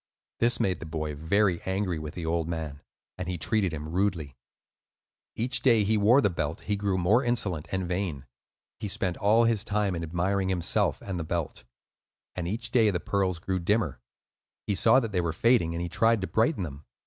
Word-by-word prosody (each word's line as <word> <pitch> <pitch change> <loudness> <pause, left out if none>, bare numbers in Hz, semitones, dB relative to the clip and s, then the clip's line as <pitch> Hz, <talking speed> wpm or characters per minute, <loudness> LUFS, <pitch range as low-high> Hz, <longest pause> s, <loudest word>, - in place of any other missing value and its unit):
This 120 +1 +3
made 95 -4 0
the 80 - -8
boy 80 -1 -3
very 85 +5 +1
angry 95 -3 -2
with 75 0 -7
the 85 - -5
old 80 0 0
man, 80 -4 -5 0.4
and 90 - -4
he 90 -1 -2
treated 95 +4 0
him 75 -1 -5
rudely. 85 -5 -1 1.0
Each 120 +3 +2
day 115 -5 +4
that - - -2
he 110 - +3
wore 110 +6 +5
the 105 - +3
belt 75 -2 -3
he 105 - -1
grew 100 -2 -1
more 100 +8 +3
insolent 105 -10 -1
and 95 -1 -1
vain. 90 -7 -3 0.5
He - - -3
spent 95 -2 -1
all 110 +3 +4
his 115 -3 +2
time 105 -2 0
in 85 - -3
admiring 90 +4 -1
himself 90 -3 0
and 95 -3 -4
the - - -2
belt. 80 -6 -4 0.7
And 90 -2 -3
each 110 +7 -3
day 115 -4 +4
the 90 -3 -1
pearls 95 -3 0
grew 95 +3 -2
dimmer. 85 - 0 0.6
He 105 - 0
saw 115 +6 +5
that 115 -4 -4
they 90 -3 +1
were 85 -2 -2
fading, 95 -4 +2
and 85 - -2
he - - -2
tried 115 +5 +2
to 95 - -2
brighten 115 - +1
them. 70 -3 -7
95 Hz, 205 wpm, -27 LUFS, 80-105 Hz, 1.0 s, wore